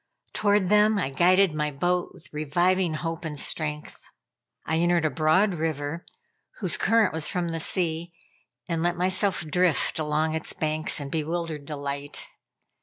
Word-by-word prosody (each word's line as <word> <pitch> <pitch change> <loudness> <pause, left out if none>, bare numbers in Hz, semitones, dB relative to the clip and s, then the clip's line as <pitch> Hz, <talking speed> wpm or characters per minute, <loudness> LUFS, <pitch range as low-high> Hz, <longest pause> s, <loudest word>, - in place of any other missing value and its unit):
Toward 205 -3 +2
them, 210 +1 +5
I 160 -9 -1
guided 180 +4 +4
my 150 -1 -1
boat 175 +5 0
with 165 - -14
reviving 175 +3 +1
hope 165 +2 -4
and 150 -3 -5
strength. 150 0 -4 0.6
I 160 - 0
entered 175 -1 +2
a 155 - +1
broad 160 +9 +3
river, 155 0 -3 0.5
whose - - 0
current 225 -5 +3
was 160 -1 +1
from 175 -1 -1
the 165 0 -3
sea, 170 0 -1 0.6
and 165 -2 -1
let 175 +1 0
myself 185 +1 +1
drift 170 +1 +1
along 155 +1 0
its 160 - -4
banks 155 0 -1
in 140 -1 -6
bewildered 160 -1 -3
delight. 140 -1 -5
165 Hz, 150 wpm, -26 LUFS, 155-180 Hz, 0.6 s, them